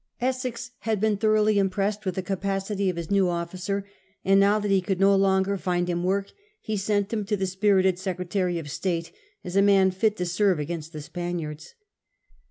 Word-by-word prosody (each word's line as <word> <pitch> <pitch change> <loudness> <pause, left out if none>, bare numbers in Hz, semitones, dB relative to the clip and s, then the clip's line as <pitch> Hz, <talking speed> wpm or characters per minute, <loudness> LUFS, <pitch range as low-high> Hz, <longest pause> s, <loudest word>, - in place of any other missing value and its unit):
Essex 250 -1 -2
had 220 -2 -1
been 215 0 +2
thoroughly 215 0 +3
impressed 200 +2 0
with 185 - -1
the 190 - -2
capacity 195 +1 -1
of 180 - -2
his 170 0 -5
new 195 -2 +3
officer, 180 +3 -3 0.4
and 195 +1 +5
now 200 +2 +4
that 205 -1 -1
he 195 -1 +4
could 185 0 -2
no 195 0 +5
longer 195 0 +2
find 175 -1 -1
him 175 0 -1
work 195 +2 0 0.3
he 215 - -3
sent 205 +1 0
him 215 -2 0
to 210 +1 -1
the 190 - -1
spirited 190 -1 +2
Secretary 180 -1 -2
of 150 -3 -6
State 170 -1 -2 0.3
as 180 - -6
a 200 - +5
man 195 -1 +5
fit 210 +3 0
to 180 - -1
serve 185 +1 +2
against 160 +1 -5
the 155 -2 -7
Spaniards. 175 - -5
195 Hz, 190 wpm, -25 LUFS, 180-205 Hz, 0.4 s, and